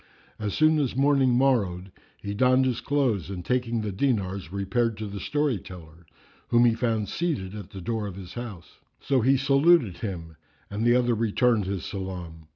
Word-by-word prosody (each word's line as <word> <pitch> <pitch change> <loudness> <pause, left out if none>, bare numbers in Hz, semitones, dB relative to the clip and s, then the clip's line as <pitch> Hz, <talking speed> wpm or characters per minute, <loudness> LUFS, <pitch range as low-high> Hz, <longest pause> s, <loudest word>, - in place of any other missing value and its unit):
As 105 -2 -3
soon 155 0 +4
as 135 -5 -1
morning 135 -1 +3
morrowed, 100 -9 +1 0.3
he 100 0 -3
donned 130 +4 +3
his 125 -3 -1
clothes 130 - 0
and 90 -3 -6
taking 120 -2 0
the 105 -1 -3
dinars, 100 - -1
repaired 110 +4 -1
to 110 - -5
the 100 -1 -6
story 145 0 0
teller, 85 -2 -13 0.4
whom 120 0 +4
he 120 - +4
found 115 -3 -1
seated 135 - -2
at 105 -4 -8
the 95 - -9
door 110 +1 -2
of 95 - -7
his 95 -2 -9
house. 110 -8 -8 0.2
So 135 -2 +1
he 135 +4 +4
saluted 140 - +3
him 85 -5 -6 0.3
and 105 +2 -2
the 120 +1 +4
other 120 -1 +2
returned 115 0 +2
his 95 -3 -3
salam. 90 -5 -6
110 Hz, 180 wpm, -26 LUFS, 95-130 Hz, 0.4 s, soon